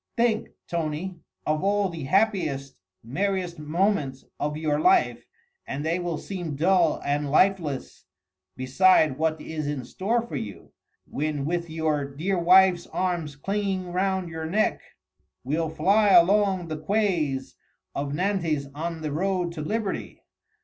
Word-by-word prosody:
think, 230 -2 +2 0.2
Tony! 170 +2 -3 0.3
of 155 +2 0
all 200 0 +2
the 165 -6 -6
happiest, 160 -8 +1 0.3
merriest 180 - -2
moments 150 -4 0
of 150 +1 -2
your 150 -1 0
life 370 - +3 0.4
and 145 +3 -4
they 165 +3 0
will 175 -3 -2
seem 175 -6 -5
dull 170 +1 +3
and 145 0 0
lifeless 160 -3 +1 0.5
beside 150 +2 +4
what 160 0 +1
is 155 -1 -4
in 145 -4 -3
store 220 +6 0
for 235 - -7
you, 105 -2 -7 0.3
when 150 -1 -2
with 170 +1 -2
your 160 -2 0
dear 160 +7 -2
wife's 180 0 +5
arms 175 -6 -2
clinging 195 +2 -2
round 190 0 0
your 160 -1 -5
neck, 210 +6 +1 0.6
we'll 155 +5 -1
fly 195 +7 +3
along 190 0 +4
the 155 -1 -4
quays 155 -9 0 0.4
of 140 0 -3
Nantes 165 -3 0
on 165 +2 -4
the 155 - -2
road 180 +2 0
to 165 -2 -6
liberty! 210 +6 -3
170 Hz, 135 wpm, -26 LUFS, 150-190 Hz, 0.6 s, wife's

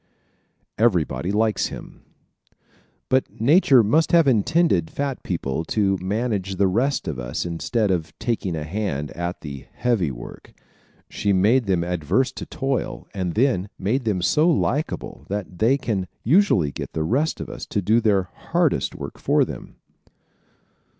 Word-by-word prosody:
Everybody 90 -4 +1
Likes 110 +1 +1
Him - - -10 0.5
¶ - - -44 0.5
But 130 0 0
Nature 135 - +5
must 155 +10 +2
have 165 -3 +6
intended 120 - +2
fat 140 -2 -3
people 80 -4 -2
to 100 0 +1
manage 100 -1 -2
the 100 - +2
rest 125 +9 0
of 75 -5 -3
us - - -3
instead 100 +5 -1
of 85 -4 -1
taking 110 -7 -2
a 75 - -3
hand 80 -4 -3
at 85 +1 -4
the 70 -3 -8
"heavy 115 -10 +1
work." - - -10 0.5
She 100 -1 -1
made 110 +7 +3
them 90 -3 +1
averse 90 - 0
to - - -8
toil 135 - -3
and 90 -3 -2
then 110 -5 +1
made 115 +7 -1
them 95 -5 0
so 155 - +3
likable 150 -1 -1
that 100 -3 -5
they 120 +5 +4
can 110 -8 -2 0.2
usually 135 - +3
get - - -7
the 80 - -1
rest 135 - 0
of - - -5
us - - -8
to - - -1
do 110 +5 +2
their 100 -4 +3
hardest 90 - -1
work - - -8
for - - +3
them. - - -9
105 Hz, 155 wpm, -23 LUFS, 90-125 Hz, 0.5 s, have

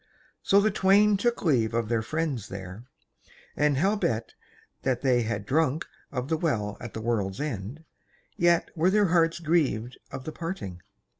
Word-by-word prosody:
So 200 - +4
the 215 +1 +3
twain 205 +1 +4
took 235 +4 0
leave 120 - +2
of 115 -2 0
their 115 0 +1
friends 140 -4 -2
there, 95 +3 -8 0.7
and 150 -2 +2
howbeit 150 - 0 0.5
that 130 -2 0
they 125 -3 +3
had 110 -3 -3
drunk 155 +3 +1 0.3
of 125 -2 -3
the 160 +1 0
Well 110 - -1
at 120 -2 -8
the 110 - -4
World's 105 -4 -1
End, 140 +1 -5 0.5
yet 170 0 +2
were 170 +2 +3
their 205 -1 +3
hearts 165 -1 +3
grieved 145 -8 0
at 135 -1 -6
the 155 - -5
parting. 155 - -6
140 Hz, 160 wpm, -27 LUFS, 115-170 Hz, 0.7 s, So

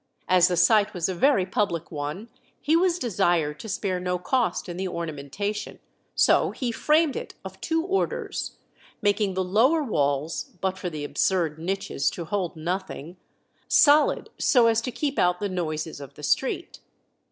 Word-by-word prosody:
As 180 -1 +5
the 180 -1 -1
site 205 +4 +4
was 170 -2 0
a 190 - -2
very 200 0 +3
public 180 -4 -1
one, 150 +8 -5 0.3
he 310 - +2
was 350 0 +3
desired 175 - 0
to 220 - -8
spare 190 -2 -1
no 180 0 -1
cost 180 +1 0
in 175 -1 -6
the 190 +1 -2
ornamentation, 170 +5 -4 0.4
so - - +4
he 250 -3 -3
framed 305 +5 +2
it - - -6
of 190 0 -9
two 325 0 0
orders, 385 +2 -2 0.5
making 205 -2 +1
the 190 - +1
lower 245 - +3
walls 145 - -1
(but 190 -1 -1
for 180 - -4
the 155 -3 -6
absurd 160 +1 0
niches 175 -4 -1
to 170 - -6
hold 185 -1 -2
nothing) 175 0 -5 0.5
solid, 295 0 +4
so 245 -3 +4
as 230 0 +3
to 250 - -4
keep 285 +3 -2
out 180 0 +2
the 205 - -1
noises 160 -5 -3
of 140 - -10
the - - -12
street. - - -1
185 Hz, 165 wpm, -25 LUFS, 170-225 Hz, 0.5 s, As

